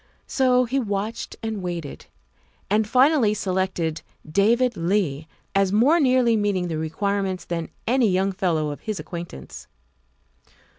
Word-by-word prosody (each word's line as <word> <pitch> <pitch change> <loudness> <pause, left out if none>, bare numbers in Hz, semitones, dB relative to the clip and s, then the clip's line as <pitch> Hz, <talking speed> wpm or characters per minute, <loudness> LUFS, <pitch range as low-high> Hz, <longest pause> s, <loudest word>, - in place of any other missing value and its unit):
So 255 -1 +2
he 265 +3 0
watched 215 0 -3
and 220 -3 -3
waited, 170 -5 -6 0.6
and 215 0 +2
finally 255 -3 +4
selected 185 -5 -1 0.3
David 230 +9 +2
Leigh 165 -4 -1 0.3
as 195 -1 +2
more 260 +11 +4
nearly 255 -5 +3
meeting 200 -4 0
the 160 -1 -2
requirements 190 +3 -2
than 165 -2 -4 0.2
any 245 -2 +3
young 190 +1 +1
fellow 170 -6 0
of 145 - -7
his 215 -3 -4
acquaintance. 165 - -8
200 Hz, 130 wpm, -23 LUFS, 175-230 Hz, 0.6 s, finally